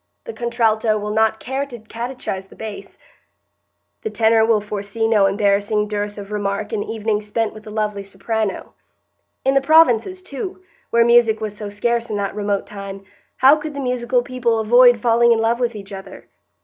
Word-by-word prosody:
The 465 - -7
contralto 225 - +1
will 210 0 -4
not 220 0 +2
care 265 +2 -3
to 245 -3 -9
catechise 225 -3 -6
the - - -15
bass; 220 -2 -8 1.0
the 440 - -3
tenor 225 - +3
will 225 -1 +3
foresee 210 +2 -3
no 210 -3 +4
embarrassing 205 +1 +1
dearth 205 0 -3
of 200 0 -8
remark 205 0 -3
in 210 - -1
evenings 215 -1 -2
spent 225 +1 -1
with 215 - -11
the - - -9
lovely 210 -1 -2
soprano. 200 +2 -3 0.7
In 270 - +3
the 275 - +3
provinces, 320 - +4
too, 370 +5 -7 0.3
where 230 0 +4
music 235 -2 +4
was 215 -2 -5
so 210 -1 -6
scarce 235 +3 -1
in 210 - -2
that 200 -1 -2
remote 205 -1 -2
time, 195 -1 -8 0.3
how 270 +3 +7
could 305 -1 -6
the - - -4
musical 250 -1 0
people 240 -2 -1
avoid 245 +2 +6
falling 235 +1 +4
in - - 0
love 225 +2 +1
with 240 -2 -1
each 200 -1 -9
other? 195 0 -10
220 Hz, 180 wpm, -20 LUFS, 205-240 Hz, 1.0 s, how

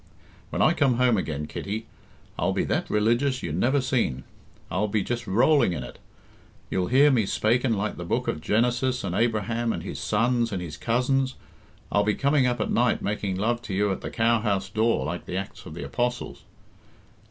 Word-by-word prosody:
"When - - 0
I 155 - +5
come 140 -7 +2
home 125 -1 +3
again, 75 -6 -2
Kitty, 105 +8 -5 0.5
I'll - - 0
be - - 0
that - - -1
religious 120 +5 +1
you 85 - -3
never 120 - +2
seen. 115 - 0 0.5
I'll 105 - 0
be 105 -1 0
just 120 0 -3
rolling 120 - +4
in 75 -6 -4
it. - - -10 0.7
You'll 90 -1 0
hear 140 +4 +5
me 115 -7 +2
spaking 120 +4 +1
like 105 0 -2
the 85 - -5
Book 85 - -1
of 75 - -2
Genesis 125 +6 +1
and 95 -3 -3
Abraham, 115 +2 0
and - - -4
his - - -6
sons, 120 -1 +1
and 95 - -2
his 85 -3 -6
cousins; 130 +3 0 0.6
I'll 105 - +3
be 105 0 +1
coming 140 -2 +2
up 120 -1 -1
at 110 - -1
night 120 +1 +2
making 100 -2 -2
love 115 +5 0
to 100 -4 -5
you 100 +1 +2
at 95 - -3
the - - -5
cowhouse 110 -4 +1
door 110 +3 +1
like 85 +3 -5
the 90 - -3
Acts 95 +1 -6
of 80 - -9
the 85 - -6
Apostles." 120 0 -3
115 Hz, 195 wpm, -26 LUFS, 100-125 Hz, 0.7 s, I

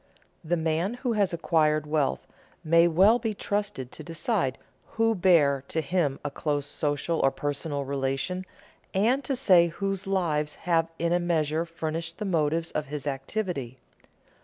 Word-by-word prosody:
The 170 +2 0
man 165 +7 0
who 245 -1 -2
has 205 -3 +2
acquired 155 -3 +1
wealth 150 -2 0 0.4
may 165 +1 +5
well 195 +8 +5
be 220 -2 -2
trusted 200 -12 -3
to - - -9
decide 165 - -1 0.4
who 225 0 +2
bear 160 -8 +3
to 160 - -1
him 155 -2 0
a 145 - -2
close 145 -1 -2
social 145 +3 -1
or 135 - +4
personal 145 +1 -3
relation, 140 +7 -2 0.5
and 240 +8 +2
to 270 +2 -1
say 185 -9 +5
whose 195 +3 -3
lives 155 -6 0
have 165 -2 +2
in 170 0 0
a 175 - +3
measure 165 -2 0
furnished 165 0 -4
the 210 - -4
motives 165 -2 0
of 150 - -3
his 145 0 -5
activity. 135 - -3
165 Hz, 155 wpm, -27 LUFS, 150-190 Hz, 0.5 s, may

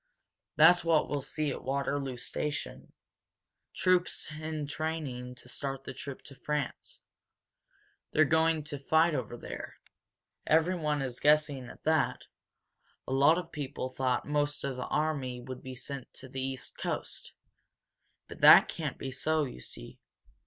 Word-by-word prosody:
That's 175 +3 +7
what 165 -2 +3
we'll 145 -1 -1
see 150 +2 -2
at - - -6
Waterloo 135 -1 -1
station 150 +4 -4 0.8
troops 180 -3 +2
entraining 155 -4 -4
to 125 - -13
start 135 +1 -4
the 130 - -6
trip 140 +1 -7
to 140 - -9
France. 140 +1 -4 1.1
They're 155 - +5
going 160 +1 +3
to 145 -1 -6
fight 160 +4 +3
over 120 - -3
there. - - -7 0.7
Everyone 160 -3 +2
is 125 -2 -4
guessing 145 -3 +3
at - - -13
that 155 -3 +1 0.8
a 130 - -2
lot 140 +5 +5
of 180 - -5
people 140 -3 -4
thought 130 -1 0
most 145 0 0
of 140 -2 -2
the 125 - -4
army 140 -5 -1
would 125 +1 -8
be 130 0 -7
sent 130 +1 -6
to 130 - -8
the 135 0 -5
East 130 0 -5
Coast. - - -3 0.9
But - - -11
that - - +10
can't - - -4
be 135 - -5
so, 155 +4 +1
you 130 - -6
see. - - -10
145 Hz, 145 wpm, -31 LUFS, 130-155 Hz, 1.1 s, that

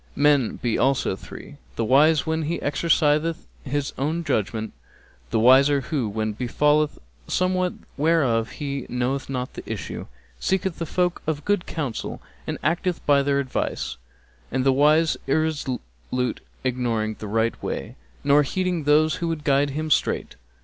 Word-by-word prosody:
Men 145 -4 +3
be 120 -3 -1
also 130 -6 +2
three: - - -11 0.2
the 115 - -1
wise 150 +6 +5
when 160 0 0
he 160 +2 -1
exerciseth 155 +2 +1 0.2
his 145 0 -2
own 160 +5 -1
judgement; 110 -6 -1 0.6
the - - 0
wiser 135 +4 +6
who, 130 -4 -2
when 110 +1 -1
befalleth 150 +6 +1 0.3
somewhat 185 0 +1 0.2
whereof 140 -7 +2
he 140 -3 -4
knoweth 125 +3 -1
not 125 -1 -3
the - - -7
issue, - - -5 0.3
seeketh 190 -2 -1
folk 180 -1 0
of 150 -2 -2
good 205 -3 +1
counsel 140 -9 -4 0.3
and - - -2
acteth 170 +3 0
by 140 -1 +5
their 140 0 +1
advice; 130 - -2 0.5
and 130 +1 0
the 135 - +5
unwise 155 +4 +4
irresolute 125 - -2 0.2
ignoring 120 -4 -1
the 105 - -6
right 110 +2 0
way - - -4 0.3
nor 145 +1 +5
heeding 180 +1 -1
those 155 +2 +4
who 170 - -2
would 165 -2 -3
guide 140 0 +3
him 155 +3 -3
straight. - - +1
145 Hz, 145 wpm, -24 LUFS, 125-160 Hz, 0.6 s, wiser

